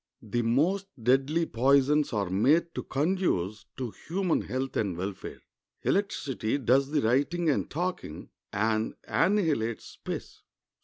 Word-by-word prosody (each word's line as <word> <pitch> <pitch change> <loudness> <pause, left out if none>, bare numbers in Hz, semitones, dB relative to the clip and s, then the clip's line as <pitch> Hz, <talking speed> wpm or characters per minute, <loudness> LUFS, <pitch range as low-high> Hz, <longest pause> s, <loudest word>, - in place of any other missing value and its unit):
The 115 +2 -1
most 160 +13 +1 0.2
deadly 135 +7 +3
poisons 140 +4 +3
are 100 -4 -1
made 155 - +3
to - - -3
conduce 135 - -1
to 125 -4 -3 0.2
human 180 0 +1
health 130 +1 -3
and 95 -5 -1
welfare. 95 +2 -6 0.4
Electricity 140 - 0
does 135 +1 +3
the 150 -1 +1
writing 145 +8 +2
and - - -1
talking, 175 - -4 0.2
and 110 +1 0
annihilates 155 - +1
space. - - -7
135 Hz, 120 wpm, -28 LUFS, 110-165 Hz, 0.4 s, deadly